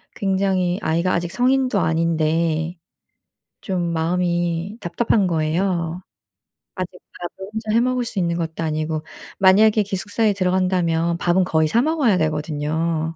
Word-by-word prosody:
굉장히 190 -2 0
아이가 170 +3 +1
아직 170 0 -1
성인도 255 -1 +2
아닌데 160 0 0 0.9
좀 175 -4 -2
마음이 175 +3 -1
답답한 205 +3 +1
거예요. 170 +1 -1 0.8
아직 185 -2 -4 0.3
밥을 175 +2 -7
혼자 220 0 -4
해 230 - +5
먹을 250 0 0
수 225 -3 -4
있는 170 -2 0
것도 165 -1 -3
아니고 155 0 -2 0.4
만약에 210 +3 +5
기숙사에 205 +2 0
들어간다면 180 -3 +1
밥은 175 +1 +2
거의 160 -3 +2
사 230 +10 +2
먹어야 285 - +2
되거든요. 155 +1 -1
175 Hz, 295 characters per minute, -21 LUFS, 165-195 Hz, 0.9 s, 해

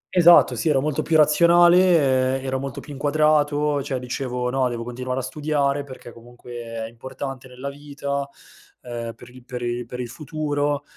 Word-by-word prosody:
Esatto 175 -1 +7
sì, 160 - 0
ero 140 -3 +3
molto 150 +1 -1
più 160 - +2
razionale, 165 -4 +5
ehm, - - -9
ero 130 0 -1
molto 135 +1 -5
più 145 - -10
inquadrato, 150 0 +1
cioè 135 -1 -3
dicevo: 125 0 -3
"No, 130 -1 +1
devo 120 -1 -4
continuare 125 +2 -4
a - - -9
studiare, 145 0 -1
perché 130 -3 -11
comunque 120 +1 -15 0.3
è - - -4
importante 130 +3 -8
nella 130 +2 -7
vita, 140 -1 -5 0.5
ehm, 120 -2 -6
per 120 +1 -14
il 125 0 -15
per 125 0 -6
il 120 0 -3
per 125 +1 -7
il 125 - -3
futuro." 145 +1 -2
135 Hz, 175 wpm, -23 LUFS, 125-150 Hz, 0.5 s, Esatto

